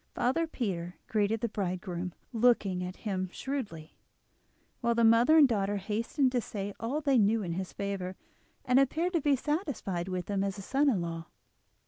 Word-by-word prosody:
Father 325 +7 +1
Peter 180 - -3
greeted 215 +1 0
the 235 - +1
bridegroom, 185 -3 -3 0.2
looking 215 -6 +3
at 180 +1 -5
him 185 -3 -1
shrewdly, 210 - -5 0.8
while 235 -2 +1
the 235 - +3
mother 230 +7 +6
and 295 -3 +8
daughter 205 -4 0
hastened 225 +7 0
to 250 -1 +1
say 205 -3 -5
all 265 +7 -2
they 275 -4 +3
knew 215 +1 +3
in 170 -2 -3
his 185 +1 -4
favour, 195 -2 -4 0.5
and 250 +1 +4
appeared 320 +7 +1
to 335 - +2
be 285 0 +3
satisfied 265 - -2
with 185 -2 -3
him 200 -1 0
as 200 0 -2
a 195 - -7
son 280 +7 +2
in 205 -9 +1
law. 165 -1 -5
210 Hz, 175 wpm, -30 LUFS, 185-255 Hz, 0.8 s, and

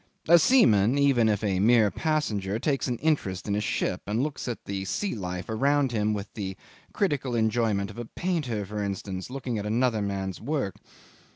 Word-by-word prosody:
A 170 +1 +8
seaman, 125 - +4
even 135 -6 +4
if 105 0 0
a 95 -3 +1
mere 110 0 +4
passenger, 110 - -1
takes 135 +3 0
an 125 -2 -1
interest 110 - -1
in 100 - 0
a 105 - 0
ship, - - -1
and 110 +5 0
looks 150 -3 -4
at 120 - -5
the 95 -1 -3
sea 200 - -2
life 90 -4 -5
around 135 +4 +2
him 105 -2 +1
with 105 -1 -4
the 95 -3 -5 0.3
critical 145 - -1
enjoyment 110 -3 +1
of - - -10
a 120 - -4
painter, 135 - -2
for 105 +2 -4
instance, 95 -1 -4
looking 125 -4 -3
at 105 - -5
another 115 0 +1
man's 95 -2 -3
work. 135 - -2
110 Hz, 185 wpm, -27 LUFS, 100-135 Hz, 0.3 s, A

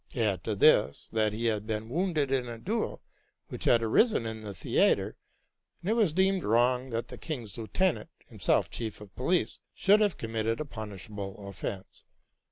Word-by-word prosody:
Add 105 -8 0
to 110 - -1
this, 70 -7 +4
that 110 -1 +2
he 110 +3 -3
had 110 -2 0
been 110 0 -2
wounded 155 -1 0
in 130 -2 +1
a 115 - -6
duel, 215 - -2 0.5
which - - -6
had 115 -1 +4
arisen 120 - +3
in 110 -1 -5
the 105 -2 -7
theatre, - - +2 0.7
and 190 - -1
it - - +4
was 220 -7 +3
deemed 190 +2 +2
wrong 125 +3 +2
that 115 -1 -3
the - - -9
king's 120 - -5
lieutenant, 160 +11 0 0.2
himself - - +1
chief 110 -3 -4
of 105 -2 -13
police, 170 +8 0 0.2
should 205 +2 +5
have 205 -6 +2
committed 115 0 -2
a 155 - -2
punishable 105 -4 -7
offence. 100 -1 -6
115 Hz, 175 wpm, -29 LUFS, 110-155 Hz, 0.7 s, should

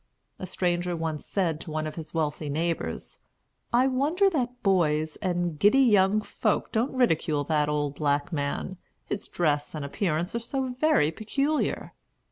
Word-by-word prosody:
A 185 - -5
stranger 175 -1 -1
once 160 -2 -4
said 170 -6 -1
to - - -8
one 155 0 -2
of 155 - -4
his 160 -2 -8
wealthy 155 -2 -2
neighbors, 165 +3 -3 0.5
"I 245 +2 +4
wonder 300 +10 +2
that 250 -5 -2
boys 160 -6 +2
and 175 -4 -2
giddy 205 +6 +5
young 210 -5 +4
folks 215 0 -1
don't 230 +5 0
ridicule 160 - +2
that 150 0 +1
old 145 -1 -1
black 145 +3 0
man, 145 +5 -2 0.3
his 205 - -4
dress 150 -3 0
and 150 -2 -4
appearance 170 +3 -1
are 235 - -1
so 260 +2 -3
very 255 - +2
peculiar." 275 - -1
175 Hz, 155 wpm, -27 LUFS, 155-235 Hz, 0.5 s, giddy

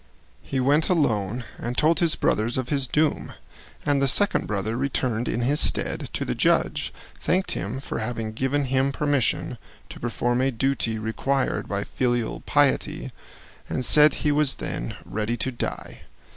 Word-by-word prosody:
He 135 - -3
went 145 +5 +3
alone 120 - +1 0.2
and 120 +1 -4
told 160 +2 +3
his 170 -3 +2
brothers 115 +4 +1
of 130 -1 -2
his 140 -3 0
doom, 150 +4 0 0.5
and 145 -2 +2
the 140 - +3
second 205 +10 +2
brother 105 +2 -2
returned 125 -3 -1
in 120 - -1
his 140 +5 +2
stead - - +1
to - - -2
the - - -1
judge, - - +1 0.3
thanked 185 +2 0
him 105 +9 -3
for 135 - -5
having 115 -3 -3
given 135 +5 0
him 135 +1 +1
permission 145 -3 0 0.3
to - - -10
perform 120 +1 0
a 135 - +2
duty 130 -2 0
required 130 +5 -1
by 100 0 -2
filial 120 -1 -1
piety, - - +1 0.6
and 130 - -2
said 150 +1 +6
he 150 - +4
was 145 -2 +2
then - - -4
ready 110 +3 -2
to 130 - -1
die. 120 - -5
130 Hz, 160 wpm, -24 LUFS, 115-145 Hz, 0.6 s, said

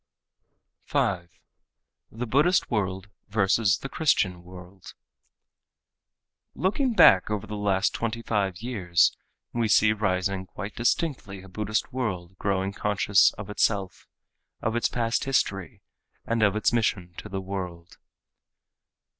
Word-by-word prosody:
5. 90 -3 0 0.8
The 115 +3 -4
Buddhist 145 +10 +2
World 95 -2 -2 0.2
Versus 100 0 +2
the - - -6
Christian 100 - +1
World 90 +1 -13 1.6
Looking 235 +6 0
back 95 - +7
over 105 -2 -2
the 105 - -6
last 100 -1 +1
twenty 115 0 -3
five 100 -3 -1
years 90 -8 +2 0.4
we 115 -1 0
see 105 0 +4
rising 95 -2 -1
quite 100 +3 -7
distinctly 120 - -1
a - - -12
Buddhist 105 +4 -2
world 95 -8 -3
growing 100 -1 -1
conscious 105 -1 +3
of 105 0 -8
itself, 100 -3 -1 0.5
of 110 +1 -2
its 120 - +1
past 115 -1 -1
history 95 -9 -1 0.4
and 115 0 0
of 105 -2 +3
its 110 +2 +1
mission 95 -6 0
to - - -8
the 95 - -3
world. 90 -3 -7
100 Hz, 120 wpm, -26 LUFS, 95-115 Hz, 1.6 s, back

